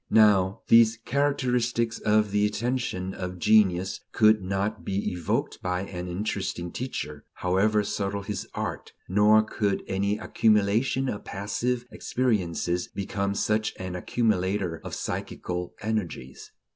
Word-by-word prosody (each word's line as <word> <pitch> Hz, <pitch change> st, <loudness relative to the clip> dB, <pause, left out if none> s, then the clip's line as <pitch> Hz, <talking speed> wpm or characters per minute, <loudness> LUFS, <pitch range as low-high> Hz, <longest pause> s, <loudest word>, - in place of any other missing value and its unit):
Now, 100 Hz, -3 st, +4 dB
these 115 Hz, 0 st, +6 dB
characteristics 125 Hz, -4 st, 0 dB
of 105 Hz, -1 st, +2 dB
the 105 Hz, 0 st, +2 dB
attention 105 Hz, -4 st, -1 dB
of 90 Hz, -1 st, -5 dB
genius 95 Hz, -2 st, +3 dB
could 110 Hz, -1 st, +5 dB
not 95 Hz, +3 st, -2 dB
be 100 Hz, +1 st, -1 dB
evoked 90 Hz, -3 st, -2 dB
by 90 Hz, 0 st, -1 dB
an 90 Hz, -2 st, -6 dB
"interesting" 95 Hz, -2 st, -3 dB
teacher, 75 Hz, -, -5 dB
however 100 Hz, +4 st, +2 dB
subtle 100 Hz, 0 st, -2 dB
his 105 Hz, -1 st, -4 dB
art; -, -, -4 dB
nor 105 Hz, +3 st, +5 dB
could 105 Hz, -2 st, -1 dB
any 100 Hz, +2 st, 0 dB
accumulation 110 Hz, +6 st, +2 dB
of 105 Hz, -5 st, -3 dB
passive 115 Hz, +5 st, -2 dB
experiences 90 Hz, -7 st, -1 dB
become 100 Hz, 0 st, -3 dB
such 110 Hz, +1 st, 0 dB
an 95 Hz, -1 st, -5 dB
accumulator 95 Hz, -3 st, 0 dB
of -, -, -5 dB
psychical 90 Hz, 0 st, -4 dB
energies. 100 Hz, -12 st, -4 dB
100 Hz, 120 wpm, -26 LUFS, 95-110 Hz, -, these